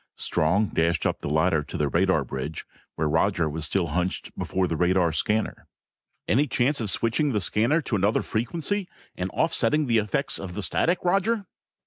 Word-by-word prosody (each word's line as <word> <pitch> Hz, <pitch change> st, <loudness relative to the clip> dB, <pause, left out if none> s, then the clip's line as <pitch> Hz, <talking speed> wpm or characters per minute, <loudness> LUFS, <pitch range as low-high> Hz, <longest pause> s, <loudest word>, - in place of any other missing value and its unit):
Strong 95 Hz, +7 st, +1 dB
dashed 85 Hz, +1 st, 0 dB
up -, -, 0 dB
the -, -, -4 dB
ladder 80 Hz, +1 st, +2 dB
to 75 Hz, -, -7 dB
the 75 Hz, -, +1 dB
radar 85 Hz, 0 st, +2 dB
bridge 65 Hz, +5 st, -5 dB, 0.3 s
where 80 Hz, -, 0 dB
Roger 80 Hz, +2 st, +1 dB
was 80 Hz, +1 st, -3 dB
still 85 Hz, +1 st, 0 dB
hunched 90 Hz, +4 st, -2 dB
before 95 Hz, 0 st, -1 dB
the 85 Hz, -, -2 dB
radar 90 Hz, 0 st, +2 dB
scanner. 105 Hz, +7 st, -1 dB, 0.6 s
"Any 140 Hz, +7 st, +3 dB
chance 135 Hz, +1 st, +1 dB
of 110 Hz, -, +1 dB
switching 120 Hz, +8 st, +1 dB
the 105 Hz, -, +1 dB
scanner 115 Hz, -, +1 dB
to 120 Hz, -, -2 dB
another 100 Hz, +2 st, +1 dB
frequency 170 Hz, -, -2 dB, 0.3 s
and 90 Hz, +1 st, -3 dB
offsetting 155 Hz, +1 st, +1 dB
the 115 Hz, -3 st, +3 dB
effects 105 Hz, -2 st, -1 dB
of 95 Hz, -2 st, -7 dB
the 105 Hz, -, -3 dB
static, 175 Hz, -, 0 dB
Roger?" 195 Hz, +4 st, +1 dB
100 Hz, 175 wpm, -25 LUFS, 85-130 Hz, 0.6 s, Any